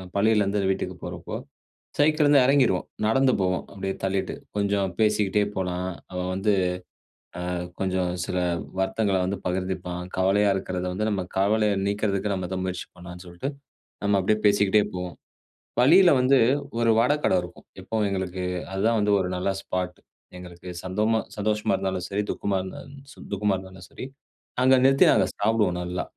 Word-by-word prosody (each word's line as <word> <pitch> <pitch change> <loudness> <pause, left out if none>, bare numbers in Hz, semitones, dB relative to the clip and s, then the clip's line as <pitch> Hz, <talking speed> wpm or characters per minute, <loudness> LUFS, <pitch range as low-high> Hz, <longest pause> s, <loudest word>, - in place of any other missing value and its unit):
பள்ளியிலேருந்து 105 -1 +2
வீட்டுக்கு - - -3
போறப்போ. - - -6 0.6
சைக்கிள்ல 155 +1 +4
இருந்து 145 -2 +6
எறங்கிருவோம் 130 -9 +3 0.2
நடந்து 130 +3 +3
போவோம். 90 -1 0
அப்டியே 95 0 -3
தள்ளிட்டு 95 -1 -1 0.2
கொஞ்சம் 100 -1 +1
பேசிட்டே 105 -1 +2
போலாம். 90 -1 -2 0.2
அவன் 90 0 -3
வந்து, 100 +2 +1 1.0
அ - - -1 0.3
கொஞ்சம் 95 -2 0
சில 90 - -3 0.4
வருத்தங்கள 95 +1 +1
வந்து 100 +2 -2
பகிர்ந்துப்பான். 90 -1 -3
கவலையா 100 +2 +3
இருக்கிறத 90 -1 -3
வந்து, 110 +3 -1
நம்ம 95 -2 -1
கவலைய 105 +1 +2
நீக்கிறதுக்கு 100 0 0
நம்ம 90 -2 -4
தான் 95 0 -2
முயற்சி 90 -1 -4
பண்ணலான்னு 90 +1 -10
சொல்ட்டு 85 +10 -5 0.6
நம்ம 100 0 +3
அப்டியே 105 +3 +1
பேசிக்கிட்டே 105 0 +4
போவோம். 90 -1 -5 0.7
வழியில 175 +8 +7
வந்து, 130 +1 +4 0.4
ஒரு 115 -1 +2
வட 125 +5 +4
கட - - +3
இருக்கும். 90 0 -12
எப்பவும் 110 -2 -1
எங்களுக்கு 95 -1 -3 0.3
அது 95 - -2
தான் 115 -1 +2
வந்து, 105 0 +2
ஒரு 90 - -2
நல்ல 90 +2 0
ஸ்பாட். 90 -2 -4 0.4
எங்களுக்கு 90 0 -10
சந்தமா 105 +5 +1 0.2
சந்தோஷமா 105 0 0
இருந்தாலும் 95 -1 -2
சரி, 100 +1 -1
துக்கமா 100 -1 -1
இருந்தாலும் 95 +9 -9 0.2
ச - - -14
துக்கமா 100 0 +1
இருந்தாலும் 95 -1 -11
சரி. - - -8 0.6
அங்க 130 +1 +6
நிறுத்தி 135 0 +6
நாங்க - - +4
சாப்டுவோம். 105 -4 +1
நல்லா. 90 +1 -3
100 Hz, 150 wpm, -25 LUFS, 90-105 Hz, 1.0 s, வழியில